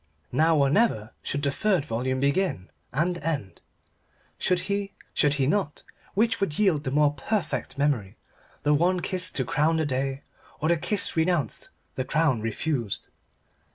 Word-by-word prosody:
Now 160 +5 +3
or 140 -1 +3
never, 140 - +2
should 145 0 -3
the 140 - +2
third 185 -1 +1
volume 130 +2 -1
begin 140 - 0 0.2
and 175 +6 0
end. 145 -11 -3 0.8
Should 180 -1 +1
he? 200 0 -2 0.2
Should 145 -1 +3
he 135 -2 +1
not? 165 0 0 0.3
Which 225 +2 +2
would 155 -7 0
yield 175 -8 +2
the - - 0
more 145 +1 +3
perfect 170 +1 -2
memory 140 -9 0 0.5
the 150 - +4
one 175 +4 +2
kiss 185 0 +1
to 130 - -1
crown 155 +5 +2
the 160 - +1
day, 135 0 -2 0.4
or 155 +2 0
the 170 - +4
kiss 200 +5 0
renounced, 160 - 0 0.2
the 130 - -2
crown 150 -5 +1
refused? 115 0 -2
150 Hz, 155 wpm, -26 LUFS, 135-180 Hz, 0.8 s, the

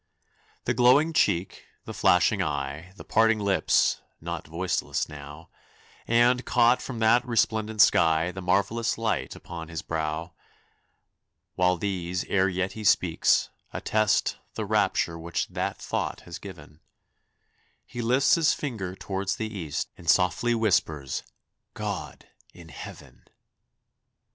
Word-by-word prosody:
The - - +1
glowing 130 +7 +4
cheek, 95 - 0 0.2
the - - -7
flashing - - +3
eye, 70 +4 -3
The - - -11
parted 115 0 +3
lips 100 -2 +2 0.2
not - - -6
voiceless 85 +3 -2
now 75 +2 -11 0.6
And, 120 +2 +3
caught 120 0 +3
from 130 - -6
that 115 +2 +4
resplendent 110 -3 +1
sky, 80 +1 +3
The 95 - -7
marvelous 100 +6 0
light 115 -1 -2
upon 85 -2 -8
his 80 -2 -6
brow, 80 +1 -3 1.2
While 90 0 +2
these, 90 -1 -2
ere 95 -1 +1
yet 95 +1 -2
he 110 - -8
speaks, 105 - +3 0.2
attest 110 -2 +1 0.2
The - - -3
rapture 85 0 +1
which 85 0 -3
that - - -3
thought - - -3
has 85 -1 -9
given; 75 -6 -12 1.1
He 120 - -6
lifts 125 +4 +3
his 165 -3 +3
finger 105 -10 -5
toward 95 +1 -5
the 110 +3 -2
east 80 -7 -4
And 85 -2 -5
softly 120 +6 +3
whispers, 80 - 0 0.5
"_God, - - -5 0.3
in 85 -2 -13
Heaven! 70 - -11
95 Hz, 125 wpm, -26 LUFS, 85-115 Hz, 1.2 s, glowing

